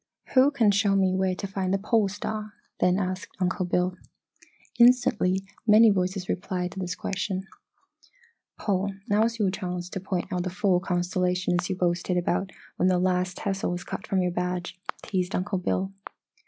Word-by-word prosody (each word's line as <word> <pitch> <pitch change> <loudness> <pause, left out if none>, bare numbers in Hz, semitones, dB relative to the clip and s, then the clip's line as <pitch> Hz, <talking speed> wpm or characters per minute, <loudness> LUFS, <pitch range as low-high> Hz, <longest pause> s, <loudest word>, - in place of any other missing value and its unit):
"Who 265 +2 +6
can 235 -8 +3
show 200 0 +2
me 190 -1 +3
where 185 0 +1
to 200 - -5
find 195 -1 -2
the 195 - +3
Pole 210 +1 +2
Star?" 210 +2 -5 0.3
then 180 0 +3
asked 185 -1 -4
Uncle 185 0 0
Bill. 180 +1 0 0.8
Instantly 235 -6 +4 0.2
many 215 +1 +7
voices 185 -1 -1
replied 180 -1 -2
to 190 - -7
this 180 -1 -3
question. 190 0 -3 1.1
"Paul, 195 -1 -1
now's 220 +3 +2
your 200 -4 +2
chance 180 -2 -4
to 190 - -4
point 185 0 -3
out 180 - 0
the 185 - -2
four 185 -1 +2
constellations 180 0 0
you 190 - 0
boasted 180 0 0
about 185 +2 0 0.3
when 180 - +3
that 185 -1 +3
last 180 0 0
tassel 195 -1 -2
was 175 0 -3
cut 205 - -6
from 190 -2 +1
your 180 - 0
badge," 180 0 -3 0.3
teased 185 -2 -1
Uncle 185 +1 -1
Bill. 190 +1 -1
185 Hz, 170 wpm, -26 LUFS, 180-200 Hz, 1.1 s, many